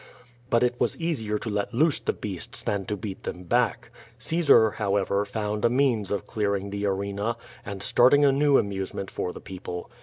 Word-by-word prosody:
But 115 -1 +3
it 125 0 +2
was - - +1
easier 120 -11 -1
to 115 - -7
let 105 +2 -2
loose 150 +3 +3
the - - -1
beasts 95 -5 -4
than 100 -2 -1
to 105 - -2
beat 100 -1 -6
them 90 - -6
back. 120 +2 0 0.3
Caesar^ 140 -7 +4
however, 100 -1 0
found 105 0 -3
a 120 - +5
means 120 -6 +1
of 100 -3 -2
clearing 100 -3 -1
the 100 0 -2
arena^ - - +2
QUO 100 +1 -2
VADI8. 110 +3 -1
^ig - - -25 0.3
and 100 -1 -5
starting 145 +7 +5
a 140 - +6
new 140 +1 +4
amusement 95 -1 -3
for 90 - -3
the - - -9
people. 90 -2 -7
105 Hz, 205 wpm, -26 LUFS, 100-120 Hz, 0.3 s, a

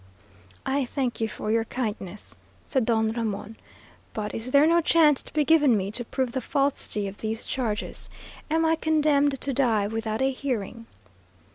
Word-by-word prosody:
"I 275 +1 +1
thank 250 -2 -2
you 225 - +2
for 215 0 -4
your 225 0 +2
kindness," 210 -6 -5 0.3
said 265 -5 0
Don 220 -1 +2
Ramon, 225 -1 -3 0.6
"but 210 -1 -3
is 225 +3 -3
there 280 +3 +6
no 340 +1 +4
chance 310 -3 +4
to - - -12
be 300 -1 +1
given 295 -7 +5
me 195 0 -2
to 240 +3 -4
prove 255 +1 -2
the 260 - -2
falsity 275 -6 -1
of 195 +1 -8
these 220 0 -3
charges? 225 -5 -3 0.4
Am 325 +1 +2
I 320 0 +3
condemned 295 -3 +2
to 275 - -1
die 230 -6 +2
without 220 +2 -2
a 270 - +2
hearing?" 235 -4 -4
245 Hz, 170 wpm, -26 LUFS, 220-280 Hz, 0.6 s, there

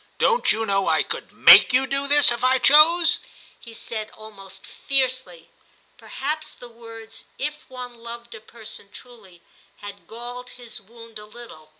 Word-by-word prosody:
* - - -38
Don't 470 - +2
you 225 +1 -1
know 195 -2 0
I - - +2
could - - -7
make - - +7
you 260 +1 +3
do 275 +1 -2
this 290 -1 +4
if 240 +1 -3
I 260 +1 +4
chose? 305 +6 +5 0.2
' - - -25
he 230 - -12
said 220 -1 -6
almost 205 -3 -10
fiercely; 255 -11 -1 0.4
perhaps 305 +2 -5
the 245 - -12
words 225 -1 -11
* - - -37
if 300 0 -13
one 250 -1 -7
loved 235 0 -8
a 220 - -11
person 220 -2 -11
truly 205 -8 -15 0.2
' - - -34
had 200 0 -10
galled 245 +2 -9
his 240 -3 -8
wound 230 +1 -13
a 210 - -11
little. 210 -9 -13
235 Hz, 180 wpm, -23 LUFS, 220-260 Hz, 0.4 s, make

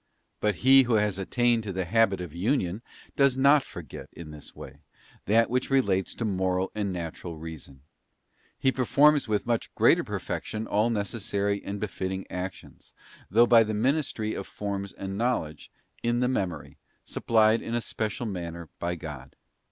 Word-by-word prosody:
But 105 -2 +1
he 135 +1 +9
who 120 -3 +1
has 105 -3 +1
attained 120 +4 +2
to 105 -3 -5
the 95 -1 -2
habit 100 0 +2
of 90 -4 -7
Union 95 0 0 0.3
does 140 -2 +3
not 140 +2 +6
forget, - - -10
in 80 -2 -10
this 75 -1 -12
way, 75 - -11 0.5
that 115 +3 +4
which 125 +1 -1
relates 100 -9 +1
to 115 - -3
moral 95 -2 0
and 105 -2 -2
natural 85 -1 -6
Reason; 80 -4 -9 0.8
he 130 - +2
performs 140 +3 +4
with 105 -2 0
much 120 -1 -1
greater - - +4
perfection 110 0 -4
all 105 +2 +1
necessary 100 -2 -1
and 100 +1 -5
befitting 95 -2 -3
actions, 90 0 -7 0.3
though 115 +5 +5
by 120 -1 +7
the 110 -1 0
ministry 120 -2 0
of 100 - -5
forms 100 -1 -4
and 95 +1 -6
knowledge, 95 -11 -1 0.3
in 120 0 +1
the 125 - +2
memory, 95 - -3 0.3
supplied 110 0 +3
in 115 - -3
a - - +2
special 110 +1 -3
manner 85 -5 -5
by 85 +1 -2
God. 75 -6 -9
105 Hz, 160 wpm, -27 LUFS, 90-120 Hz, 0.8 s, he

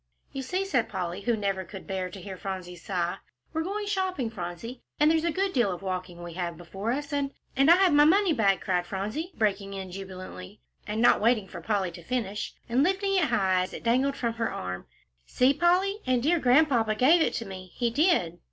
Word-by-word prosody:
"You 270 - -4
see," 365 +9 -2
said 250 - 0
Polly, 180 -1 -4
who 235 +2 +1
never 195 -2 -1
could 190 +2 -10
bear 190 -2 -3
to 190 - -9
hear 190 +1 -7
Phronsie 185 -2 -6
sigh, 175 0 -2 0.4
"we're 320 - 0
going 405 +5 -3
shopping, 375 - -1
Phronsie, 200 +5 -6 0.2
and 300 +1 +5
there's 320 0 +2
a 340 - +1
good 385 +2 -1
deal 235 -6 +2
of 180 +1 -6
walking 185 -2 -4
we 170 -1 -7
have 170 -1 -4
before 195 +6 -4
us, 290 +3 -3
and 285 -1 0
" - - -40
"And 275 +3 +4
I 340 - +9
have 370 -3 +4
my 290 0 +7
money 375 +2 +4
bag," 200 -7 +2
cried 180 -2 0
Phronsie, 215 - -4
breaking 200 -2 0
in 190 -1 -6
jubilantly, 185 - -8 0.3
and 215 +2 -1
not - - +5
waiting 220 -3 +2
for 175 -2 -9
Polly 195 -1 0
to 170 - -11
finish, 210 0 -3
and 240 +3 +2
lifting 390 +4 +1
it 370 -4 +3
high 195 -8 +2
as 185 - -4
it - - -7
dangled 260 +4 +2
from 235 -3 -1
her 225 -2 -2
arm. 90 0 -5 0.4
"See, 255 +2 +3
Polly, 360 +6 +2
and 250 -2 +2
dear 335 +4 +3
Grandpapa 250 -5 +3
gave 295 +10 +5
it - - +1
to 230 - -3
me, 185 -2 -9
he 240 -2 0
did." 235 - +2
225 Hz, 220 wpm, -27 LUFS, 190-295 Hz, 0.4 s, I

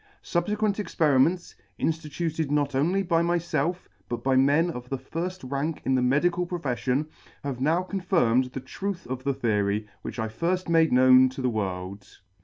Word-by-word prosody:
Subfequent 205 +4 0
experiments, 165 -2 +2 0.3
inftituted 160 -1 -2
not 145 -1 +1
only 175 +9 +1
by 170 -2 +2
myfelf, 170 0 -1 0.2
but 120 -1 -4
by 135 0 +2
men 145 +6 +3
of 125 -4 -8
the 135 - -2
lirll 165 +1 -5
rank 145 +3 -2
in 130 - +2
the 130 - +2
medical 170 +8 +2
profeffion, 140 -4 -1 0.4
have 135 -3 -4
now 165 +6 +2
confirmed 175 - +1
the 130 +1 -7
truth 190 +7 -5
of 130 0 -5
the 140 -1 0
theory 105 -2 0
which 110 - -7
I 110 -2 -1
firfh 170 +11 -2
made 165 -1 +3
known 130 +1 +6
to 130 +1 -7
the 125 - +2
world. 95 -2 -5
145 Hz, 165 wpm, -26 LUFS, 130-175 Hz, 0.4 s, known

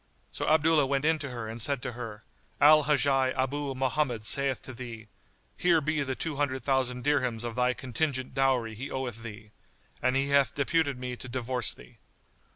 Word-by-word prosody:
So - - -4
Abdullah 155 -2 +4
went 140 +1 0
in 160 0 +3
to 140 -2 -4
her 120 -3 -5
and 115 +1 -6
said 140 +3 +1
to - - -3
her, 115 -3 -8 0.4
"Al 150 0 +7
Hajjaj 135 -3 +2
Abu 135 +1 -1
Mohammed 130 -3 -1
saith 135 +2 +2
to 130 - -8
thee: 115 -3 -9 0.5
Here 175 -2 +4
be 155 0 -1
the 135 -2 -2
two 155 0 -3
hundred 135 -2 -1
thousand 130 -2 0
dirhams 125 -5 0
of 120 -1 -4
thy 125 0 +1
contingent 130 0 -2
dowry 130 -4 +1
he 125 +6 -6
oweth 125 -4 -4
thee; 110 -2 -10 0.5
and 125 +1 +1
he 135 +1 +1
hath 140 -1 +3
deputed 145 -1 +1
me 125 0 -5
to 130 - -8
divorce 125 -1 0
thee." - - -13
130 Hz, 185 wpm, -28 LUFS, 120-145 Hz, 0.5 s, Al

